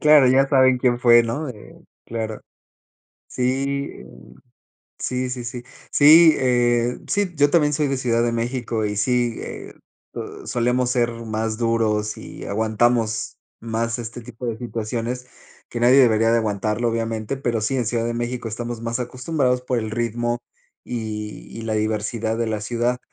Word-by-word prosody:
Claro, 150 -4 +7
ya 135 +1 +4
saben 130 -2 +4
quién 120 -1 +2
fue, 120 -1 +6
¿no?, 130 +6 -3
eh, 105 -4 -11 0.3
claro. 110 -1 -4 0.9
Sí, 135 +2 -1
eh, - - -12 0.9
sí, 125 0 -2
sí, 125 -1 -5
sí. 120 +1 -6 0.3
Sí, 155 +2 +8
eh, 120 -1 +2
sí, 200 -3 0
yo 145 0 +4
también 150 -3 +3
soy 150 0 +1
de 135 - 0
Ciudad 120 -2 +1
de 120 - +1
México 115 -1 -2
y 105 0 -2
sí, 120 +1 +1
eh, - - -8 0.4
uh, - - -7
solemos 125 +1 +1
ser 120 -2 +2
más 110 0 -2
duros 110 -2 0
y - - -9
aguantamos 110 +1 0 0.2
más 115 +1 -2
este 120 +1 -6
tipo 120 +1 -8
de 115 -1 -3
situaciones, 120 +1 -4 0.4
que 120 - -5
nadie 125 +3 +6
debería 115 -3 +5
de 115 - +4
aguantarlo, 105 +1 -1
obviamente, 115 +2 -2
pero 120 -4 -1
sí, 135 +5 -1
en 125 -4 0
Ciudad 115 0 0
de 120 - -2
México 120 0 -3
estamos 120 +1 -5
más 115 +2 -2
acostumbrados 125 0 -1
por 125 -1 -1
el 110 -1 -3
ritmo 120 +1 -1 0.4
y 110 -2 -6
y - - -6
la 110 -1 -3
diversidad 110 +1 -1
de 115 -1 -1
la 110 -1 -2
ciudad 120 +2 -1
120 Hz, 165 wpm, -22 LUFS, 115-125 Hz, 0.9 s, Sí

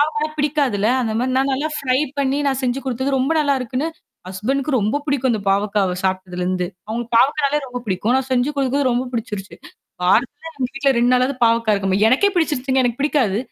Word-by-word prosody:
பாவக்காலாம் 305 +1 -1
பிடிக்காதுல! 280 -8 +1 0.2
அந்த 225 -2 -2
மாரி 255 - 0
நான் 270 +1 +1
நல்லா 285 +4 -1
ஃப்ரை 260 -3 +1 0.2
பண்ணீ 275 0 +1
நான் 270 -1 -1
செஞ்சு 250 +1 -1
குடுத்தது 260 +2 -1
ரொம்ப 265 +4 +1
நல்லா 285 -2 +2
இருக்குன்னு, 255 +5 -2 0.4
ஹஸ்பண்ட்க் 255 +10 -2
ரொம்ப 215 +6 0
புடிக்கும் 270 -2 +1
அந்த 220 - -1
பாவக்காவ 200 -2 +1
சாப்ட்டதுலருந்து. 185 -1 -1 0.2
அவுங்களுக்கு 235 +1 -4
பாவக்காயனாலே 290 +2 +2
ரொம்ப 250 0 -5
பிடிக்கும். 210 +5 0
நான் 265 0 -5
செஞ்சு 255 +3 +2
குடுக்குறது 270 -1 +1
ரொம்ப 250 +2 -1
பிடிச்சிருச்சு. 210 -4 -5 0.5
வாரத்துல 270 - +1
எங்க 270 -6 -3
வீட்ல 275 0 +2
2 245 +1 +3
நாளாவது 255 +2 +2
பாவக்கா 230 -1 +2
இருக்கும 195 -1 0
எனக்கே 280 - +3
பிடிச்சிருச்சுங்க, 265 -5 +1
எனக்கு 240 +2 -1
பிடிக்காது! 260 -9 +1
255 Hz, 180 wpm, -20 LUFS, 215-280 Hz, 0.5 s, 2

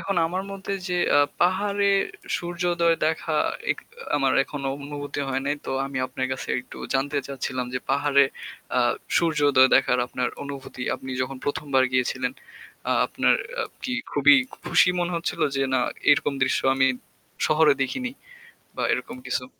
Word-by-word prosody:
এখন 195 -2 -2
আমার 185 +3 -2
মধ্যে 195 0 -5 0.2
যে 180 - -1 0.2
আ - - +7 0.2
পাহাড়ে 200 +3 +2 0.5
সূর্যোদয় 175 -1 +1
দেখা 160 0 -1 0.4
এক - - 0 0.4
আমার 135 -2 +2
এখনো 140 -2 -4
অনুভূতি 145 0 -5
হয় 135 0 -1
নাই 145 - +1
তো - - -3 0.2
আমি 140 -1 -4
আপনার 130 0 -3
কাছে 130 - -5
একটু - - -13 0.2
জানতে 140 +2 +1
চাচ্ছিলাম 130 -2 -3
যে - - +1
পাহাড়ে 140 0 +4 0.5
আ - - +4 0.4
সূর্যোদয় 145 -5 +4
দেখার 125 - +4
আপনার 125 0 -2
অনুভূতি 140 -2 -7
আপনি 130 - -8
যখন 135 +1 -4
১ম 145 +1 -2
বার 130 0 +6
গিয়েছিলেন 130 0 0 0.6
আ - - +4
আপনার - - +2 0.3
আ - - +1 0.2
কি 255 - -3 0.2
খুবই 145 0 +6 0.3
খুশি - - +5
মনে 175 0 -1
হচ্ছিলো 170 - -1
যে 135 - +1
না 130 - +3 0.3
এরকম 145 0 +3
দৃশ্য 130 - +2
আমি 135 0 +3 0.6
শহরে 155 -1 +5
দেখিনি 255 - -2 0.7
বা - - -2
এরকম 235 - -4
কিছু? 125 - -1
145 Hz, 155 wpm, -25 LUFS, 130-170 Hz, 0.7 s, আ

